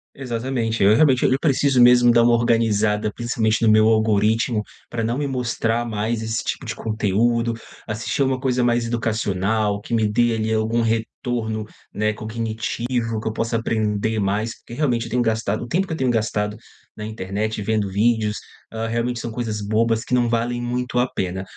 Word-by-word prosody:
Exatamente, 120 -3 -2
eu 100 +2 +6
realmente 130 0 +4
eu 130 - +3
preciso 140 -3 +2
mesmo 120 0 +7
dar 120 - +5
uma 120 0 +4
organizada, 110 -3 +2
principalmente, 115 -2 0
no 110 - +5
meu 110 0 +5
algoritmo 110 +1 +2 0.3
pra 115 - -2
não 115 +2 -1
me 145 +1 -1
mostrar 120 -3 -1
mais 110 +1 -2
esse 110 0 -2
tipo - - -4
de - - -3
conteúdo. 115 +2 0 0.3
Assistir 110 +5 -3
alguma 130 -1 +2
coisa 125 -1 0
mais 120 -1 +2
educacional, 110 -2 0
que 120 - -5
me 110 -2 +2
dê 115 +3 +2
ali 110 0 -1
algum 110 +2 +1
retorno, 115 0 -2 0.3
né, 105 +1 +1
cognitivo, 115 +1 -3
que - - -1
eu - - -3
possa 115 +1 -1
aprender 110 -1 -1
mais. 105 +3 -1
Porque, - - -11
realmente, 125 -4 0
eu 115 - -8
tenho 125 - +1
gastado 110 -2 -1
o - - -10
tempo 185 +7 0
que 160 - -4
eu - - -4
tenho 130 -4 +1
gastado 105 -2 -1 0.4
na 105 - -6
internet, 110 +1 -3
vendo 105 -1 0
vídeos, 110 +1 +1 0.3
hã, 115 0 -3
realmente 120 +1 -1
são 120 - -5
coisas 110 -2 -3
bobas 110 +1 +1
que - - -9
não 120 -1 +3
valem 120 +1 -1
muito 125 +1 -2
a 125 - +3
pena. 95 0 -3
115 Hz, 185 wpm, -22 LUFS, 110-120 Hz, 0.4 s, mesmo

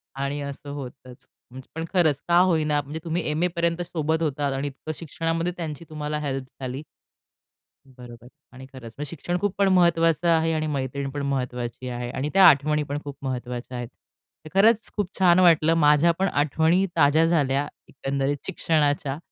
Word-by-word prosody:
आणि 140 +1 -3
असं 140 0 -7
होतंच. 130 -2 -10 0.2
म्हणजे 130 0 -11
पण 165 - -3
खरंच 155 -6 +3
का 170 0 +4
होईना 155 -5 +2
म्हणजे 150 +3 -7
तुम्ही 170 +1 -2
एम 155 +3 -1
ए - - +4
पर्यंत 170 0 0
सोबत 160 -1 -1
होतात 145 -2 -1
आणि 135 +2 -2
इतकं 140 +3 -7
शिक्षणामध्ये 165 +2 -2
त्यांची 160 -1 -6
तुम्हाला 150 0 -4
हेल्प 135 -3 -3 0.2
झाली. 130 +2 -4 1.1
बरोबर 120 -2 -13 0.3
आणि 130 0 -11
खरंच, 115 -3 -10
शिक्षण 175 +3 -3
खूप 205 0 -1
पण 200 -1 +3
महत्वाचं 165 -2 +3
आहे 165 -1 +3
आणि 155 0 -1
मैत्रीण 140 -1 -3
पण 145 +1 -5
महत्वाची 125 -2 -3
आहे, 120 0 -4
आणि 140 +4 -3
त्या 195 -1 +7
आठवणी 150 0 +4
पण 145 +1 -4
खूप 145 -1 -7
महत्वाच्या 125 -1 -5
आहेत. 120 -1 -5 0.7
खरंच, 215 +3 +4
खूप 205 -4 -1
छान 180 -1 +5
वाटलं 165 -2 +5
माझ्या 150 +2 +5
पण 195 - +2
आठवणी 160 +6 +2
ताज्या 155 +1 +4
झाल्या, 145 -4 +1 0.2
एकंदरीत 140 +1 -2
शिक्षणाच्या 145 -3 0
150 Hz, 165 wpm, -24 LUFS, 135-165 Hz, 1.1 s, त्या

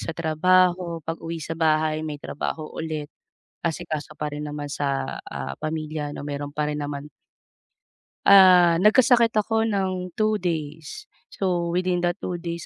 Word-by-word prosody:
sa 165 - -4
trabaho 175 +1 +2
pag-uwi 165 0 -5
sa 165 - -5
bahay 155 -1 +2
may 150 -1 -4
trabaho 155 +2 -4
ulit, 155 -2 -4 0.6
asikaso 155 -2 -3
pa 150 0 -2
rin 150 0 -5
naman 145 0 -5
sa, 140 -2 -2
ah, 65 0 -5
pamilya 155 -1 -3
'no, - - -7
meron 145 0 -4
pa 150 0 -1
rin 150 - -3
naman. 145 0 -5 1.2
Ah, 180 -3 +7
nagkasakit 235 +1 +5
ako 225 +1 +1
ng 185 -3 -1
2 215 -1 +2
days. 160 - -4 0.2
So 175 -3 -1
within 180 0 0
that 175 +3 -1
2 175 -3 -4
days, 170 -2 -5
165 Hz, 145 wpm, -24 LUFS, 150-185 Hz, 1.2 s, Ah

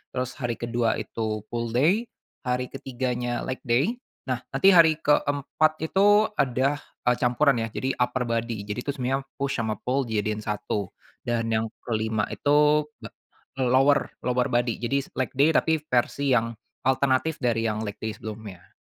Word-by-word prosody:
Terus, 130 +1 -3
hari 120 -2 -2
kedua 115 0 0
itu 110 -2 -3
pull-day, 130 - +1 0.4
hari 125 0 -1
ketiganya 125 -2 -3
leg-day. 130 - 0 0.2
Nah, 130 -2 -2 0.2
nanti 195 +8 +6
hari 165 -3 +7
keempat 150 +1 +2
itu 205 +5 +4
ada, 135 +1 +1 0.3
eee, 125 - +5
campuran 130 +3 +3
ya, - - -2
jadi 130 +3 -1
upper-body. 115 -3 -1
Jadi 105 +4 -3
tuh, - - +2
sebenarnya 135 +1 -1 0.2
push 140 -3 -1
sama 110 -2 -1
pull 135 +2 0
dijadiin 110 -1 -1
satu. 105 -2 -2 0.4
Dan, 115 -1 -1
yang 110 +1 0 0.2
kelima 110 -1 0
itu 150 +1 +3 0.8
lower 130 +3 +3
lower-body, 125 -2 0
jadi, 135 +3 0
leg-day 135 +4 +2
tapi, 160 -1 +3
versi 135 +3 +1
yang 115 0 +1 0.4
alternatif 135 +3 +2
dari 115 -1 +1
yang 110 0 -2
leg-day 110 +1 -5
sebelumnya. 105 -4 -9
125 Hz, 135 wpm, -25 LUFS, 115-140 Hz, 0.8 s, hari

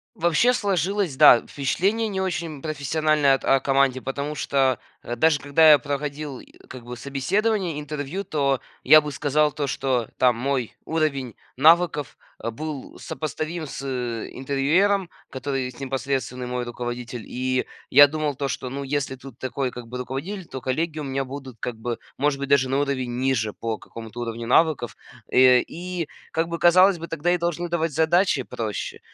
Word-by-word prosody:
Вообще 170 +9 +3
сложилось, 195 - 0
да, 145 -5 +7
впечатление 195 +11 0
не 190 -2 -3
очень 165 -6 -3
профессиональное 155 -1 +2
от 135 - -4
о 135 -1 +4
команде, 135 -1 +2
потому 140 +3 -4
что, 135 -3 +1 0.3
э, 120 - -3
даже 155 +2 +3
когда 155 +3 +5
я 150 - +9
проходил, 145 -1 -4
э, - - -13 0.2
как 130 -2 -9
бы, 125 0 -7
собеседование, 170 - -1
интервью, 150 +5 -4
то 140 -3 0 0.2
я 155 +3 +8
бы 150 -1 -6
сказал 150 +2 +1
то, 145 -2 -2
что, 130 -3 -1
там, 125 -2 +4
мой 130 -2 -2
уровень 140 -7 -1 0.2
навыков, 155 -2 +4 0.3
э, 115 - -2
был 150 +3 -7
сопоставим 155 +3 -4
с 130 - -7
интервьюером, 135 - 0 0.2
который 130 -1 -3
непосредственный 130 -2 -3
мой 125 0 -3
руководитель. 120 -1 -5
И 130 0 -1 0.2
я 145 +2 +9
думал 150 -1 -2
то, 140 +1 -3
что, 130 -1 -4
ну, 140 +1 -4
если 135 -1 -2
тут 130 -1 -12
такой, 130 0 -2
как 120 -1 -9
бы, 125 +2 -6
руководитель, 160 +9 -5
то 130 - -7
коллеги 155 +5 -2
у 150 - -4
меня 135 0 -2
будут, 130 -2 -8
как 120 -2 -4
бы, 115 +1 -4 0.2
может 140 0 0
быть, 140 - -3
даже 135 -2 +4
на 135 +1 0
уровень 130 -4 -2
ниже 120 -5 0
по 115 -1 -4
какому-то 115 +1 -9
уровню 115 0 -4
навыков. 150 -4 +2 0.3
Э, 125 -1 +6
и, 175 -1 -5 0.2
как 165 +1 0
бы, 170 0 -3
казалось 185 +1 +5
бы, 165 - -6
тогда 165 +2 -1
и 180 - +2
должны 170 0 -2
давать 165 -2 -1
задачи 160 -1 +2
проще, 110 -3 -5
140 Hz, 170 wpm, -24 LUFS, 130-160 Hz, 0.3 s, я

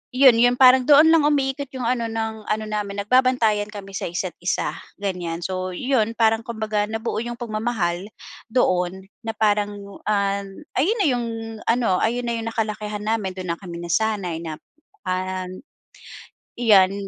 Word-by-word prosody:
'yon, 255 -3 +7
'yon 245 +1 +5
parang 255 0 +7
doon 300 +2 +7
lang 320 -3 +5
umiikot 280 -1 0
'yong 255 - -4
ano, 235 -1 0
ng 220 -1 -4
ano 215 0 0
namin 205 -1 -3
nagbabantayan 230 -3 +3
kami 205 -2 -9
sa 195 - -3
isa't 175 +1 -3
isa, 175 - -1 0.2
ganyan. 180 -4 -4
So, 185 0 -3
'yon 230 -1 0
parang 225 -1 +3
'kumbaga 215 -2 -2
nabuo 225 +1 -3
'yong 240 +1 -4
pagmamahal 215 -6 -2 0.4
doon 185 -6 +1 0.2
na 225 0 -3
parang 205 -1 +1 0.3
an 200 +2 -1 0.2
ayon 370 - +2
na - - +3
'yong 240 -1 -1 0.4
ano, 230 -6 +2
ayon 240 +2 0
na 240 - -2
'yong 225 - -5
nakalakihan 215 -2 -3
namin, 210 -4 -1
do'n 185 -2 -4
na 170 - -4
kami 180 -4 -8
nasanay 180 -1 0
na 160 -2 -5 0.5
an 185 0 -3 1.0
iyan, 200 -5 +5
215 Hz, 155 wpm, -23 LUFS, 190-235 Hz, 1.0 s, yon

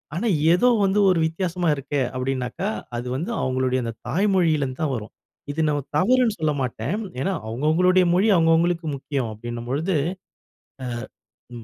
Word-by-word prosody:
ஆனா 230 +7 -1 0.3
ஏதோ 215 +8 +3 0.2
வந்து 195 +2 +2
ஒரு 175 -3 +3
வித்தியாசமா 175 +1 -2
இருக்கே 140 0 -2
அப்டினாக்கா, 130 +8 -2 0.3
அது 120 +1 -5
வந்து 170 - -3
அவங்களுடைய 130 0 0
அந்த 115 -1 -4
தாய் 200 +5 +1
மொழியில 160 -6 +3
இருந்து 130 +2 -6
தான் 145 -4 0
வரும். 110 -1 -7 0.4
இது 160 +2 -2
நான் 145 -2 -1
தவறுன்னு 235 +3 +3
சொல்லமாட்டேன். 140 - -1 0.3
ஏன்னா, 195 - 0
அவங்க 120 +6 -5
அவங்களுடைய 180 +3 +4
மொழி, 195 +5 +3
அவங்க 165 -1 +4
அவங்களுக்கு 170 0 +1
முக்கியம் 135 -4 -3
அப்டின்னும் 120 +2 -7
பொழுது, 160 +7 0 0.9
அ, - - -3 0.7
ம் 115 - -8
155 Hz, 160 wpm, -23 LUFS, 130-180 Hz, 0.9 s, அவங்களுடைய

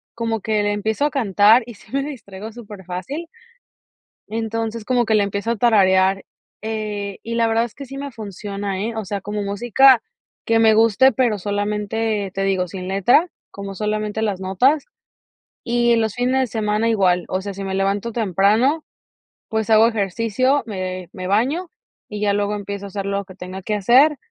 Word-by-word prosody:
como 230 -2 -2
que 215 -1 0
la 205 - +1
empiezo 220 +6 -1
a 295 - 0
cantar 220 -2 +4
y 240 - -9
sí - - -19
me 275 - +1
distraigo 220 -7 -8
superfácil. 210 - -7 1.0
Entonces, 225 0 -3
como 245 -2 +2
que 220 - +2
la 205 - +4
empiezo 200 +3 -2
a - - 0
tararear, 195 -4 +3 0.4
eh, 210 -2 -4
y 230 0 -4
la 230 -1 +2
verdad 225 +1 +2
es 240 - -10
que 275 - -8
sí 275 +2 -9
me 280 0 -5
funciona, 200 -2 -5
eh. 225 +2 -3
O 220 -2 -4
sea, 200 +1 -4
como 210 +2 -4
música 240 +5 +4 0.4
que 225 0 +3
me 220 -1 +5
guste, 230 +4 +5
pero 240 -5 +1
solamente, 210 +1 -2
te 195 - -2
digo, 190 -2 0
sin 185 +1 -7
letra, 200 - +3 0.2
como 200 -1 -7
solamente 215 +1 -2
las 205 -4 -1
notas. 245 +11 +2 0.8
Y 240 0 +2
los 220 -2 0
fines 250 +2 +1
de 260 - 0
semana 215 0 0
igual, 185 -5 +2
o 185 - -2
sea, 200 +1 -5
si 195 +1 -6
me 190 0 -3
levanto 200 +4 0
temprano, 220 - +2 0.7
pues, 220 -1 -2
hago 220 +1 +7
ejercicio, 230 +6 0
me 185 -4 -5
me 185 -4 -6
baño, 260 - 0 0.4
y 210 -1 -6
ya 205 -1 +2
luego 205 0 0
empiezo 200 0 -5
a - - -7
hacer 195 0 -5
lo 200 0 -2
que 185 -1 -13
tenga 185 +1 -8
que 210 +2 -2
hacer, 255 +9 +5
210 Hz, 185 wpm, -21 LUFS, 200-230 Hz, 1.0 s, hago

